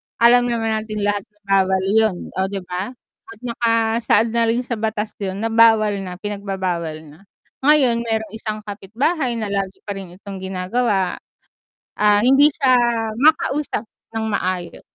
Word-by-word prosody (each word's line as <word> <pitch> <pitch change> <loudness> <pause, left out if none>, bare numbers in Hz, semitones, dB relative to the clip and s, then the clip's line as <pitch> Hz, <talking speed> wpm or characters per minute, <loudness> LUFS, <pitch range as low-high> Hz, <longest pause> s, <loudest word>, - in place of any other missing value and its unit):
alam 245 +1 +5
naman 225 -2 0
natin 215 -1 -5
lahat 205 -1 0
ng 210 0 -39
bawal 190 -1 +3
yun, 210 0 +2 0.2
oh, 190 - +1
'di 195 -1 -5
ba? 185 +7 -5 0.3
At 225 -1 -12
nakasaad 230 -1 +1
na 235 0 +2
rin 235 +2 +1
sa 240 -2 -4
batas 220 -1 -2
yun, 195 0 -4
na 225 - -1
bawal 225 -2 +5
na 185 -2 -6
pinagbabawal 185 -5 -4
na. 150 +1 -15 0.5
Ngayon, 275 -6 +4
merong 220 -2 -2
isang 215 -1 -5
kapitbahay 235 - -2
na 220 -3 -3
lagi 195 -1 -3
pa 205 - -6
rin 185 -3 -9
itong 195 0 -9
ginagawa, 190 +2 -1 0.8
ah, 210 -1 +5
hindi 270 +3 +6
siya 265 -4 +3 0.5
makausap 300 -5 +2 0.3
ng 220 -1 -2
maayos, 180 -3 -2
215 Hz, 155 wpm, -20 LUFS, 195-230 Hz, 0.8 s, hindi